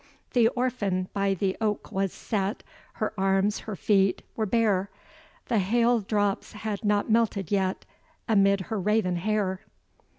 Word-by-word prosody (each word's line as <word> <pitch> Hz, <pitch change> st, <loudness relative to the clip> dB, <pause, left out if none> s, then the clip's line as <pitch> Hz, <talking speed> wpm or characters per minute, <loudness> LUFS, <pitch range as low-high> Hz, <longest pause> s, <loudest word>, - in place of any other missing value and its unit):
The 235 Hz, -3 st, +5 dB
orphan 205 Hz, -8 st, -1 dB
by 195 Hz, -1 st, +1 dB
the 190 Hz, +1 st, -1 dB
oak 210 Hz, -2 st, -1 dB
was 195 Hz, -1 st, 0 dB
set, 200 Hz, -2 st, -3 dB, 0.3 s
Her 215 Hz, -, -2 dB
arms, 195 Hz, +2 st, +2 dB
her 215 Hz, -, -6 dB
feet, 195 Hz, -1 st, +2 dB
were 220 Hz, -1 st, -1 dB
bare, 200 Hz, -3 st, +2 dB, 0.6 s
The 225 Hz, -, +1 dB
hail 235 Hz, +5 st, +3 dB
drops 205 Hz, -1 st, -1 dB
had 210 Hz, -1 st, -4 dB
not 205 Hz, +1 st, +1 dB
melted 215 Hz, -5 st, +1 dB
yet, 190 Hz, -2 st, 0 dB, 0.4 s
Amid 200 Hz, -3 st, +4 dB
her 215 Hz, +2 st, -3 dB
raven 195 Hz, -2 st, +1 dB
hair. 190 Hz, 0 st, -1 dB
205 Hz, 140 wpm, -27 LUFS, 195-220 Hz, 0.6 s, The